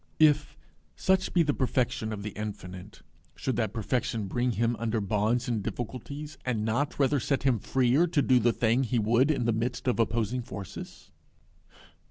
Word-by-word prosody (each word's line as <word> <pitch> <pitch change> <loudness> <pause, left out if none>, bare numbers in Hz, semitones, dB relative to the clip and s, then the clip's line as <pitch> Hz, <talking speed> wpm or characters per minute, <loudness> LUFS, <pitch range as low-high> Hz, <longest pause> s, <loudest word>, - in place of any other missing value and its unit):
If 150 -1 +3 0.4
such 190 0 +1
be 175 - +4
the 145 -2 +1
perfection 125 -4 0
of 105 -2 -5
the 105 - -4
Infinite, 95 -2 -7 0.3
should 130 - -2
that 110 -4 0
perfection 115 -1 -1
bring 120 +5 0
him 115 +3 +1
under 115 -1 0
bonds 110 +4 0
and 115 -3 0
difficulties, 130 +8 -6
and 115 -4 -1
not 120 +7 0
rather 140 0 +3
set 140 +3 -1
him 130 -5 +2
freer 135 - +2
to 160 -3 +2
do 130 0 +4
the 120 +1 +3
thing 115 +2 +2
he 125 0 0
would 115 +5 +3
in 135 -6 +1
the 115 - +2
midst 120 +4 -2
of 125 - +1
opposing 115 +2 0
forces? 100 -6 -9
120 Hz, 175 wpm, -28 LUFS, 110-130 Hz, 0.4 s, be